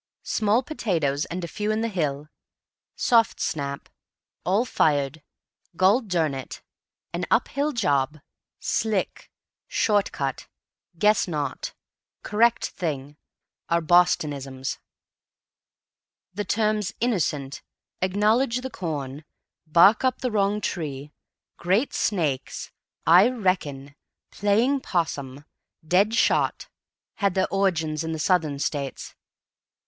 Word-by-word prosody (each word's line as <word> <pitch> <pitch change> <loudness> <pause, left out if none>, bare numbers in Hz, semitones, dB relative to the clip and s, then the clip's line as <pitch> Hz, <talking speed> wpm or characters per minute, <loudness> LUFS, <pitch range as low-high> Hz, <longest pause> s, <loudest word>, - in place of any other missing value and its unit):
"Small 215 +4 +1
potatoes, 165 - -1
and 175 0 -5
few 210 +6 -3
in 215 +1 0
the 230 - 0
hill," 150 -8 -2 0.7
"soft 230 -2 +3
snap," 140 -3 -3 0.6
"all 200 +7 +2
fired," 145 - +1 0.5
"gol 190 +8 +4
durn 170 - 0
it," 135 -1 -7 0.5
"an - - -2
up - - +2
hill 290 +2 0
job," 145 - +1 0.4
"slick," 215 -3 -1 0.4
"short 205 -2 +1
cut," 135 -2 -4 0.5
"guess 210 +2 +3
not," 150 -5 -3 0.5
"correct 225 +2 +2
thing" 145 -4 -4 0.5
are 170 - +3
Bostonisms. 145 -6 +1 1.5
The 205 +2 -3
terms 215 -2 0
"innocent," 155 - -1 0.4
"acknowledge 215 +7 +2
the 260 0 -6
corn," 150 -6 -5 0.4
"bark 175 +9 +6
up 255 -1 +1
the 250 -2 -1
wrong 205 0 +1
tree," 150 -6 -4 0.5
"great 195 +10 +1
snakes," 150 -10 -1 0.3
"I 180 +8 +7
reckon," 165 - -2 0.4
"playing 225 +8 +2
'possum," 145 - -3 0.4
"dead 200 +6 +3
shot," - - +1 0.5
had 200 -2 +1
their 190 0 +2
origin 170 -6 +1
in 160 0 -3
the - - -3
Southern 155 -3 +1
States. 140 -1 -3
180 Hz, 105 wpm, -25 LUFS, 145-210 Hz, 1.5 s, I